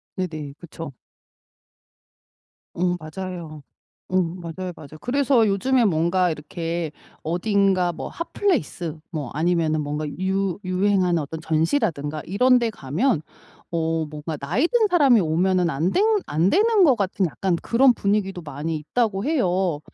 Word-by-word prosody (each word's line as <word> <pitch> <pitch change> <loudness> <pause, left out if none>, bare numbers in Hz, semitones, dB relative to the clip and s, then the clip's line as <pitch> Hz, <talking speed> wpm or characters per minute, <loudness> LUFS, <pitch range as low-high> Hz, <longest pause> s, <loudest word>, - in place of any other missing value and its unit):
네네. 155 -7 -4
그쵸. 165 -3 -8 1.8
어 180 +1 0
맞아요. 160 -2 -7 0.5
어 185 - +1
맞아요, 175 +1 -5
맞아요. 155 0 -12
그래서 260 -3 +3
요즘에 240 +5 +2
뭔가 175 0 +2
이렇게 165 +1 -4 0.3
어딘가 185 +1 +2
뭐 - - -6
핫플레이스 270 - -2
뭐 155 -4 -4
아니면은 160 -1 +1
뭔가 150 +1 -3
유 190 -1 -1
유행하는 185 -2 +2
어떤 155 +3 -6
전시라든가 160 - 0
이런 250 +7 +4
데 235 -1 0
가면 170 - 0 0.5
어 165 -1 0
뭔가 155 +1 -5
나이 180 - 0
든 455 -1 +3
사람이 275 - +5
오면은 175 +2 +2
안 165 +5 0
되 - - +1 0.3
안 160 +6 +2
되는 425 0 +4
것 275 -7 +6
같은 195 -2 0
약간 180 +3 -1
그런 250 +5 +4
분위기도 200 -3 -1
많이 155 +2 -4
있다고 205 - -1
해요. 185 - +1
180 Hz, 285 characters per minute, -23 LUFS, 160-205 Hz, 1.8 s, 것